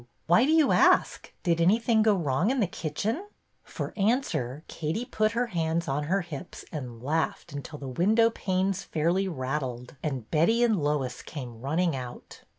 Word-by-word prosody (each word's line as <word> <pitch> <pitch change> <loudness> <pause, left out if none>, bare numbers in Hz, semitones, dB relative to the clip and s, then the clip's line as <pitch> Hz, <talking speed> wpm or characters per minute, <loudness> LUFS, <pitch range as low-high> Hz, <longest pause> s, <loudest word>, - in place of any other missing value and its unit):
Why 220 +11 +5
do - - +3
you 320 -3 +5
ask? - - +3
Did 170 -2 +2
anything 220 +5 +4
go 215 -1 +4
wrong 160 - +1
in 265 +1 +1
the 215 - +3
kitchen? 205 - -3 0.2
" - - -45
For - - -6
answer 195 - 0
Katie 165 +10 -3
put 215 -2 0
her 240 +1 +1
hands 170 -5 -1
on 145 +2 -1
her 190 +6 +1
hips 170 0 -8
and 125 -6 -7
laughed 160 +2 -1
until 145 +2 -6
the 140 - -7
window 215 - +3
panes 190 -2 -1
fairly 170 +5 0
rat 135 -3 -2
tled, 125 -1 -6
and 135 -7 -3
Betty 220 +10 +3
and 220 -7 +2
Lois 145 -4 -1
came 120 -6 -8
running 160 +4 +1
out. 125 -2 -8
170 Hz, 175 wpm, -27 LUFS, 140-215 Hz, 0.2 s, Why